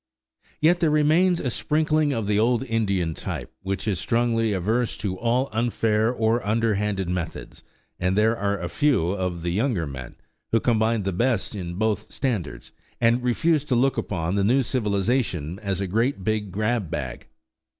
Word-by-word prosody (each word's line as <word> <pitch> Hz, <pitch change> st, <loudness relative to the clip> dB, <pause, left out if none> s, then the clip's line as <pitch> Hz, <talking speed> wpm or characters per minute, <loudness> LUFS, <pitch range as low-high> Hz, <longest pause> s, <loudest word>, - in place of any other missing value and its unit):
Yet 170 Hz, +3 st, +4 dB
there 165 Hz, -, +3 dB
remains 160 Hz, +4 st, +3 dB
a 125 Hz, -, -2 dB
sprinkling 155 Hz, +2 st, +1 dB
of 115 Hz, -6 st, -1 dB
the 105 Hz, 0 st, +1 dB
old 120 Hz, +3 st, +2 dB
Indian 100 Hz, -9 st, 0 dB
type, -, -, -6 dB
which 95 Hz, +2 st, -3 dB
is 100 Hz, -4 st, 0 dB
strongly 115 Hz, -1 st, +1 dB
averse 110 Hz, +6 st, 0 dB
to 100 Hz, -3 st, -3 dB
all 120 Hz, +6 st, +1 dB
unfair 110 Hz, -1 st, +1 dB
or 115 Hz, 0 st, +1 dB
underhanded 105 Hz, -3 st, 0 dB
methods; 90 Hz, -1 st, -5 dB, 0.4 s
and 90 Hz, +2 st, 0 dB
there 110 Hz, +2 st, +3 dB
are 100 Hz, -2 st, -1 dB
a 85 Hz, -, -3 dB
few 125 Hz, -, +1 dB
of 90 Hz, -3 st, -3 dB
the 85 Hz, -, -1 dB
younger 105 Hz, -3 st, 0 dB
men 65 Hz, -3 st, -8 dB, 0.4 s
who 115 Hz, -, +4 dB
combine 110 Hz, -2 st, +1 dB
the 95 Hz, 0 st, -2 dB
best 115 Hz, +2 st, 0 dB
in 85 Hz, -3 st, -5 dB
both 110 Hz, +1 st, -1 dB
standards, 105 Hz, -, -3 dB, 0.3 s
and 120 Hz, +1 st, +3 dB
refuse 145 Hz, +5 st, +2 dB
to 130 Hz, -, 0 dB
look 130 Hz, +2 st, +2 dB
upon 85 Hz, -2 st, -2 dB
the 100 Hz, 0 st, +1 dB
new 130 Hz, +6 st, +3 dB
civilization 100 Hz, -, -1 dB
as 100 Hz, -3 st, -2 dB
a -, -, 0 dB
great, 115 Hz, +3 st, 0 dB
big 105 Hz, -1 st, -1 dB
grab 105 Hz, -1 st, -1 dB
bag. 65 Hz, -5 st, -5 dB
110 Hz, 170 wpm, -24 LUFS, 95-120 Hz, 0.4 s, Yet